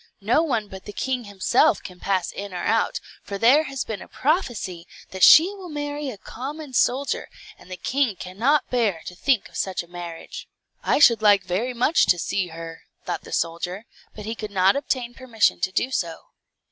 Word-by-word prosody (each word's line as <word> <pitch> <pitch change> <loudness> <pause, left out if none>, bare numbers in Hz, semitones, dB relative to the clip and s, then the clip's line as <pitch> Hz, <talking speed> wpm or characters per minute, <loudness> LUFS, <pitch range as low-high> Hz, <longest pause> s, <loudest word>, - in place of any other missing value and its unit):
No 230 +9 +3
one 235 -10 -1
but 190 -1 -11
the 205 - -8
king 255 0 -2
himself 200 -2 +2
can 180 -2 -10
pass 190 -1 -1
in 200 -2 -7
or 175 - -4
out, 225 - +1 0.2
for 200 - -6
there 260 +9 +5
has 270 -1 -3
been 215 -4 -6
a - - -10
prophecy 240 - -2 0.2
that 190 - -7
she 345 - +8
will 380 -3 -10
marry 290 -1 -4
a 230 - -7
common 285 +7 -8
soldier, 265 +3 +1 0.3
and - - -18
the 185 - -6
king 260 -3 0
cannot 230 - 0
bear 220 -9 0
to - - -7
think 240 +4 +1
of - - -19
such 190 -2 -2
a - - -17
marriage." 175 -1 -8 0.3
"I - - +2
should 235 -7 +6
like 205 -2 +5
very 225 +9 -2
much 265 +7 +3
to 175 - +4
see 180 +2 -1
her," 165 0 -9 0.2
thought - - -3
the - - -11
soldier; 175 +5 -2 0.3
but 210 - -8
he 220 - -3
could 215 -2 -6
not 190 -1 +3
obtain 255 -4 -2
permission 230 - +1
to 185 - -1
do 255 +7 0
so. 170 -9 -3
215 Hz, 195 wpm, -23 LUFS, 185-265 Hz, 0.3 s, she